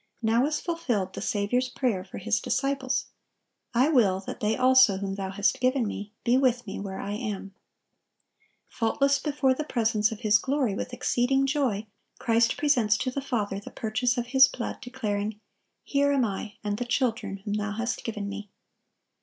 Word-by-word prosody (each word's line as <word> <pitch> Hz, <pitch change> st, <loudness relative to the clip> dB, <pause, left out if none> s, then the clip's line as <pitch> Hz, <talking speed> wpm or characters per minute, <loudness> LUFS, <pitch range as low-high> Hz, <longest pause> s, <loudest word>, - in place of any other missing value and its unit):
Now 230 Hz, +4 st, +3 dB
is 305 Hz, -, -1 dB
fulfilled 245 Hz, -, -2 dB
the -, -, -6 dB
Saviour's 245 Hz, +5 st, 0 dB
prayer 225 Hz, -9 st, -1 dB
for 185 Hz, -, -10 dB
His 100 Hz, +1 st, 0 dB
disciples, 270 Hz, -, -1 dB, 0.7 s
"I 255 Hz, +5 st, +3 dB
will 210 Hz, -11 st, +3 dB
that -, -, -7 dB
they 215 Hz, +1 st, 0 dB
also 255 Hz, -5 st, +6 dB
whom 195 Hz, 0 st, -3 dB
Thou 195 Hz, -1 st, -4 dB
hast 200 Hz, +1 st, +1 dB
given 255 Hz, -1 st, +2 dB
Me 205 Hz, 0 st, -6 dB
be 245 Hz, +2 st, +3 dB
with 250 Hz, -2 st, +2 dB
Me 195 Hz, -, -6 dB
where 195 Hz, -1 st, -5 dB
I 200 Hz, -, -4 dB
am." 205 Hz, -3 st, -4 dB, 1.1 s
"Faultless 275 Hz, +5 st, +1 dB
before 280 Hz, -3 st, +1 dB
the 305 Hz, -, -3 dB
presence 225 Hz, -6 st, +1 dB
of 225 Hz, +1 st, -7 dB
His 210 Hz, -2 st, +4 dB
glory 265 Hz, -5 st, 0 dB
with 225 Hz, -, -4 dB
exceeding 250 Hz, +2 st, +1 dB
joy,"(1120) 265 Hz, -7 st, 0 dB, 0.3 s
Christ 230 Hz, 0 st, +2 dB
presents 240 Hz, -8 st, +3 dB
to 255 Hz, -, -2 dB
the 275 Hz, -, -3 dB
Father 210 Hz, -7 st, -2 dB
the 200 Hz, -, -10 dB
purchase 225 Hz, +3 st, -1 dB
of 240 Hz, -, -1 dB
His 265 Hz, 0 st, +8 dB
blood, 255 Hz, -2 st, -5 dB
declaring, 215 Hz, -4 st, -3 dB, 0.4 s
"Here 285 Hz, 0 st, +2 dB
am 270 Hz, -3 st, +3 dB
I, 205 Hz, +1 st, -4 dB
and 205 Hz, 0 st, -2 dB
the 245 Hz, -, -2 dB
children 230 Hz, -5 st, -1 dB
whom 205 Hz, -, -2 dB
Thou 210 Hz, -1 st, -2 dB
hast 235 Hz, +3 st, -3 dB
given 210 Hz, -3 st, -4 dB
Me." 205 Hz, +1 st, -6 dB
230 Hz, 180 wpm, -27 LUFS, 205-260 Hz, 1.1 s, His